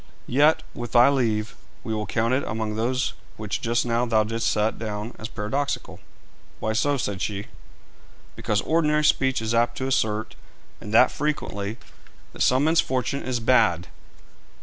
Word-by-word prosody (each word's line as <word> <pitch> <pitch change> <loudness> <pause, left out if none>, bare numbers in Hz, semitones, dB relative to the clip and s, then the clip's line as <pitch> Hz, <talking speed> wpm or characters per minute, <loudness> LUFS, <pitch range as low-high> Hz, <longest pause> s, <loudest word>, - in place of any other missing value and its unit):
Yet, 150 +5 +3
with 120 -1 -7
thy 120 +2 +7
leave, 110 -6 0 0.3
we 110 - -3
will 105 -1 -3
count 115 +2 0
it 130 - +1
among 110 0 -3
those 125 +4 -1 0.2
which 105 -2 -4
just 115 +1 0
now 120 0 +1
thou 110 -2 +3
didst 115 +2 -1
set 105 +1 0
down 105 +1 -4
as 110 - -5
paradoxical.' 120 +7 -3
'And - - -27 0.5
why 110 - -1
so?' 145 +5 +1
said 100 -6 -3
she. 100 +1 -3 0.9
'Because 105 0 -1
ordinary 150 -2 +2
speech 130 -5 +2
is 110 +1 -1
apt 120 +1 +1
to 130 - -2
assert, 110 -4 0 0.5
and 105 - -8
that 125 +3 +6
frequently, 110 -8 -3 0.6
that - - -8
some 130 +2 +4
men's 160 +2 +4
fortune 130 +2 -2
is 125 -2 -2
bad.' 110 -8 +2
115 Hz, 165 wpm, -24 LUFS, 110-130 Hz, 0.9 s, thy